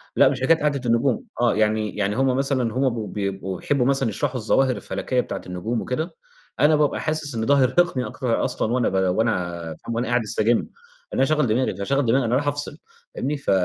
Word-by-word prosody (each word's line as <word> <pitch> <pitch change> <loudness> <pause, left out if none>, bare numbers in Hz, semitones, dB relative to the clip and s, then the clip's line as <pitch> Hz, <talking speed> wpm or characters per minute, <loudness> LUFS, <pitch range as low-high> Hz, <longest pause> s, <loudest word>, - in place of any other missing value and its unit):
لأ، - - +6
مش 130 -2 -3
حكاية 160 +5 +4
قعدة 145 -3 0
النجوم، 115 +2 +1 0.2
آه، 120 - +3
يعني 110 0 0
يعني 105 0 -1
هم 130 -1 +2
مثلًا 130 -5 0
هم 130 +1 +2
ب 115 -3 -5
بيبقوا 95 -2 -3
يحبوا 140 -4 +1
مثلًا 135 -3 +2
يشرحوا 135 +1 -2
الظواهر 125 +3 +2
الفلكية 125 -1 -2
بتاعة - - -6
النجوم 90 +6 -3
وكده، 155 +7 -3 0.4
أنا 155 +1 +5
بابقى 150 -1 +1
حاسس 155 -4 -2
إن 110 0 -1
ده 145 - +4
هيرهقني 135 0 +2
أكتر 120 -3 -1
أصلًا 115 - -1
وأنا 125 -1 +2
ب - - -8 0.2
وأنا 90 -7 0 0.2
فاهم، 115 - -3
وأنا 120 0 -1
قاعد 120 0 +2
أستجم، 110 +2 +1
إن - - -6 0.5
أنا - - +1
هاشغّل 150 -1 +2
دماغي، 115 -2 0
فاشغّل 135 +7 0
دماغي، 125 +2 +2
أنا 120 +2 +1
رايح 145 +2 0
أفصل 145 0 -2 0.4
فاهمني، 145 +2 -2
ف 140 - -2
125 Hz, 205 wpm, -23 LUFS, 110-140 Hz, 0.5 s, لأ